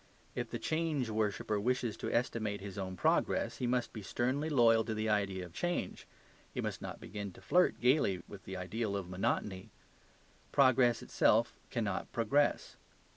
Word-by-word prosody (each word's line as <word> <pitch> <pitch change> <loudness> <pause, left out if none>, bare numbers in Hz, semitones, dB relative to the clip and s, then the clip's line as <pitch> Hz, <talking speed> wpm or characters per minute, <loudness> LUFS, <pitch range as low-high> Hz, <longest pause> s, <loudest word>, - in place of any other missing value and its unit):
If - - -3
the - - -3
change 155 -7 -1
worshipper 110 0 0
wishes 120 0 0
to - - -3
estimate 110 -4 0
his 100 -1 -7
own 95 -1 -4
progress, - - +1
he 125 - -1
must 125 0 0
be 110 - -6
sternly 130 +9 -1
loyal 115 -5 +5
to 110 -1 -2
the 110 +1 -1
ideal 100 -3 0
of 85 - -13
change; 175 - -2 0.4
he - - -5
must - - -3
not - - -6
begin 100 -2 -6
to - - -14
flirt 180 0 +3
gaily 125 - +3
with 100 -2 -11
the 95 0 -5
ideal 100 +3 -2
of 95 -3 -5
monotony. 95 0 -1 0.8
Progress 130 -3 +4
itself 115 +2 +3 0.2
cannot 105 -6 -2
progress. 140 +6 +1
110 Hz, 165 wpm, -33 LUFS, 100-125 Hz, 0.8 s, loyal